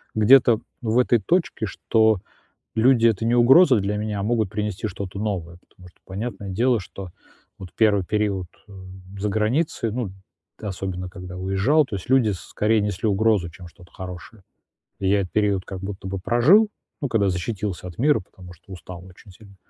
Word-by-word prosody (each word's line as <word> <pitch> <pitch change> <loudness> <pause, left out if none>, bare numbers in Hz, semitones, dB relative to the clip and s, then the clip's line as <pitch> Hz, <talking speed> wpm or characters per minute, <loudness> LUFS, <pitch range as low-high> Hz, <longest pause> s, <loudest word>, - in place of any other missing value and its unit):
где-то 115 +1 +5 0.2
в 115 -1 0
этой 120 -1 +3
точке, 170 - 0
что 110 +1 +2 0.6
люди- 115 0 +4
это 110 -1 0
не 115 - +2
угроза 130 +2 +6
для 100 +1 -2
меня, 105 -1 -3
а - - -2
могут 110 -2 0
принести 105 0 -3
что-то 100 -1 -6
новое. 90 -5 -3
Потому 90 - -17
что - - -31
понятное 100 +1 -6
дело, 120 +5 +1
что 95 0 -9 0.5
вот 95 - -9
1 105 -4 +3
период, 105 -3 -1 0.2
э, - - -16 0.5
за 105 +1 -1
границей, 115 +3 0
ну, 115 -2 -3 0.5
т 105 - -7
особенно 90 -1 -5
когда 90 -1 -9
уезжал, 95 +12 +2
то 110 - -6
есть 95 - -8
люди 130 -5 +4
скорее 105 +4 0
несли 105 +1 -2
угрозу, 100 -3 +2
чем 90 +2 -12
что-то 90 +1 -19
хорошее. 95 +3 -9 0.6
И 95 - -1
я 100 0 +3
этот 90 - -6
период 100 -3 +1
как 95 - -7
будто 95 -1 -6
бы 95 0 -4
прожил, 150 - +4 0.3
ну, 140 - -1
когда 100 -4 +2
защитился 95 +1 -4
от 90 - -10
мира, 145 0 +3
потому 90 -2 -14
что 95 +3 -14
устал 90 0 -10
очень 95 +2 -16
сильно. 100 +1 -17
105 Hz, 180 wpm, -23 LUFS, 95-115 Hz, 0.6 s, угроза